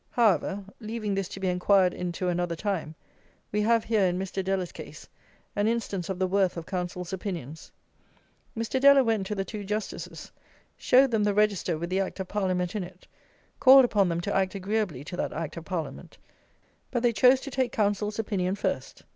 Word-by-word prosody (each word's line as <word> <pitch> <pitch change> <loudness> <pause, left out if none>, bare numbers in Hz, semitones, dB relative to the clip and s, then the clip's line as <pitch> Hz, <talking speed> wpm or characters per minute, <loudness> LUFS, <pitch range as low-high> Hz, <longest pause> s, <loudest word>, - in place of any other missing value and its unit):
However, 200 -3 +2 0.2
leaving 215 -2 -3
this 195 -2 -1
to 195 - -8
be 190 - -1
enquired 180 +1 +3
into 180 +1 -3
another 175 -1 -1
time, 165 -5 -3 0.6
we 210 - +1
have 230 +1 +3
here, 215 -4 +2
in 180 0 -1
Mr. 190 0 -3
Deller's 190 -2 -1
case, - - -10 0.5
an 205 +1 +1
instance 205 -6 -2
of 190 - -2
the 185 - +1
worth 190 -1 +1
of 165 - -5
counsels' 180 -1 -4
opinions. 170 -6 -6 0.9
Mr. 230 +3 -1
Deller 280 -1 +7
went 220 -4 0
to 210 - -3
the 195 -1 -2
two 210 -1 -6
Justices, 210 +1 -5 0.4
showed 265 +1 +4
them 220 -2 +2
the 205 -1 +1
Register 205 -5 +1
with 170 +3 -5
the 190 - +1
Act 195 0 -3
of 190 - -3
Parliament 185 -1 -1
in 205 - -1
it, 180 +1 -12 0.5
called 265 0 +8
upon 200 -6 +2
them 170 0 -1
to 200 - -2
act 190 0 +1
agreeably 195 -7 -2
to 175 - -7
that - - -2
Act 165 -2 -4
of 165 - -7
Parliament; 175 -5 -5 0.7
but 240 -1 -2
they 240 -1 +3
chose 255 +3 +5
to 275 - -7
take 255 -1 0
counsels' 210 0 0
opinion 195 -4 -1
first. - - -3
195 Hz, 190 wpm, -27 LUFS, 180-215 Hz, 0.9 s, called